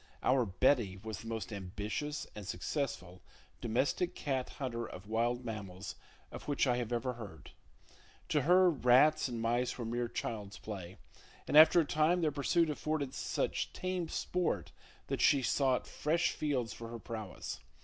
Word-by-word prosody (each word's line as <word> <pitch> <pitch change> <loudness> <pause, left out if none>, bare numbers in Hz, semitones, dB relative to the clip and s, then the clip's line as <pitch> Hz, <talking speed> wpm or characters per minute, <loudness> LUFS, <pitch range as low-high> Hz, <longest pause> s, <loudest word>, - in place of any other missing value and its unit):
Our 130 -3 +3
"Betty" 100 -1 +2
was 110 +1 -6
the 115 - -9
most 110 -2 -4
ambitious 105 +10 -4
and 105 -2 -8
successful 90 - -3 0.4
domestic 135 +10 0
cat 135 -3 -2
hunter 120 -4 -4
of 95 -3 -8
wild 120 +3 0
mammals 100 -5 -6 0.4
of - - -9
which 145 -1 +2
I 125 -2 +2
ever 120 0 -1
have 125 - -4
heard. 95 -9 -10 0.8
To - - +3
her, 180 +2 +6
rats 135 +2 +5
and 120 -2 -4
mice 120 +2 0
were 120 - -4
mere 120 +1 -1
child's 105 -4 -4
play, 95 -4 -7 0.5
and - - -1
after 160 +3 +9
a 165 - +3
time 155 +5 +2
their 155 -2 +2
pursuit 155 +3 +2
offered 150 -2 -2
such - - -2
tame 185 -3 -2
sport 175 - -1 0.3
that - - -2
she 140 -2 +5
sought 130 0 +2
fresh 165 +3 +1
fields 130 -7 -1
for 115 - -8
her 115 +1 -6
prowess. 110 -5 -6
120 Hz, 160 wpm, -33 LUFS, 110-150 Hz, 0.8 s, after